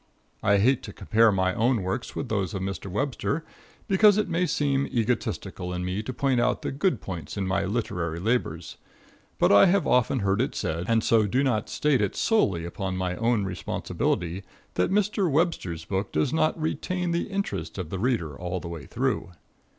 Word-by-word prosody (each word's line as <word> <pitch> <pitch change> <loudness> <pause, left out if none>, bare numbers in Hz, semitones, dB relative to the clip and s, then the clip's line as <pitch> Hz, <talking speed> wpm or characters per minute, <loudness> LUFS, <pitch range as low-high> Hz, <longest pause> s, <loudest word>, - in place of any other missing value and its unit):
I 100 0 +4
hate 120 +6 +3
to - - -9
compare 115 0 +3
my 95 -1 +1
own 115 0 +1
works 95 +1 -3
with - - -3
those 100 -5 -1
of 95 - -3
Mr. 95 0 -4
Webster, 140 - -2 0.4
because 205 +1 +5
it 215 - +1
may 175 +1 0
seem 140 -3 +1
egotistical 110 -5 -2
in 90 0 -3
me 90 +3 -2
to 110 - -5
point 130 -1 +1
out 125 +1 +1
the - - -2
good 140 - 0
points 80 0 -6
in 100 - -1
my 95 +1 0
literary 90 -6 -2
labors; 90 -6 -1 0.6
but - - +4
I 100 0 +8
have 195 +1 +3
often 125 0 +2
heard 100 +2 +1
it 135 - -2
said, 85 +1 -2
and 115 -1 +2
so 110 -2 +3
do 130 +7 +1
not 115 -6 0
state 150 -5 +2
it 100 - -1
solely 95 - +2
upon 95 +2 -4
my 90 -1 -1
own 115 -3 +1
responsibility, 90 0 -2 0.3
that - - +1
Mr. 200 -1 +1
Webster's 135 - 0
book 95 +3 -2
does 75 - 0
not 160 0 +1
retain 180 +3 -2
the 170 - -1
interest 150 - -3
of 90 -4 -5
the 95 - -3
reader 105 - 0
all 90 +3 -4
the 85 - -8
way 85 -3 -7
through. 120 -6 -2
105 Hz, 190 wpm, -26 LUFS, 90-135 Hz, 0.6 s, I